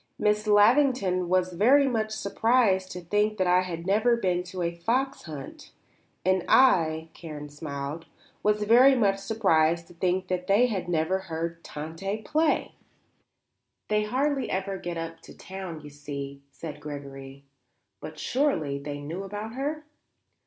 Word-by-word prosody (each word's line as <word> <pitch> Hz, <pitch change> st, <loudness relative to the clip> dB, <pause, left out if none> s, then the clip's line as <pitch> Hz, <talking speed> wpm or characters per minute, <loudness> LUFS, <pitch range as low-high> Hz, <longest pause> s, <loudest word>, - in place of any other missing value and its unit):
Miss 210 Hz, 0 st, +1 dB
Lavington 205 Hz, -4 st, +4 dB
was 185 Hz, 0 st, +1 dB
very 265 Hz, +10 st, +5 dB
much 220 Hz, -4 st, 0 dB
surprised 210 Hz, -2 st, +1 dB
to 180 Hz, -, -6 dB
think 210 Hz, +4 st, 0 dB
that 185 Hz, -, +1 dB
I 180 Hz, 0 st, +4 dB
had 170 Hz, -2 st, -5 dB
never 215 Hz, +5 st, +3 dB
been 180 Hz, -6 st, 0 dB
to 180 Hz, 0 st, -5 dB
a 170 Hz, 0 st, -1 dB
fox 250 Hz, +10 st, -1 dB
hunt; 150 Hz, -4 st, -9 dB, 0.5 s
and 185 Hz, -1 st, +2 dB
I," 165 Hz, -11 st, +4 dB
Karen 150 Hz, -3 st, -8 dB
smiled, 145 Hz, +1 st, -6 dB, 0.3 s
"was 210 Hz, 0 st, +1 dB
very 250 Hz, +5 st, +6 dB
much 200 Hz, -5 st, +2 dB
surprised 170 Hz, -6 st, +2 dB
to -, -, -14 dB
think 185 Hz, +2 st, -1 dB
that 180 Hz, 0 st, -2 dB
they 205 Hz, +5 st, +5 dB
had 190 Hz, -7 st, -2 dB
never 170 Hz, +3 st, +1 dB
heard 165 Hz, +1 st, -4 dB
Tante 170 Hz, +8 st, -5 dB
play." 310 Hz, +3 st, +1 dB, 1.2 s
"They 210 Hz, 0 st, +2 dB
hardly 270 Hz, +3 st, 0 dB
ever 195 Hz, 0 st, -2 dB
get 175 Hz, -1 st, -5 dB
up 165 Hz, 0 st, -5 dB
to -, -, -14 dB
town, 185 Hz, -4 st, -7 dB
you 150 Hz, 0 st, -11 dB
see," 140 Hz, -1 st, -7 dB
said 150 Hz, +1 st, -8 dB
Gregory. 140 Hz, -2 st, -8 dB, 0.6 s
"But 155 Hz, +7 st, -9 dB
surely 155 Hz, -, 0 dB
they 145 Hz, 0 st, -6 dB
knew 160 Hz, +6 st, -5 dB
about 205 Hz, +3 st, -6 dB
her?" 295 Hz, +4 st, -3 dB
185 Hz, 150 wpm, -27 LUFS, 160-215 Hz, 1.2 s, very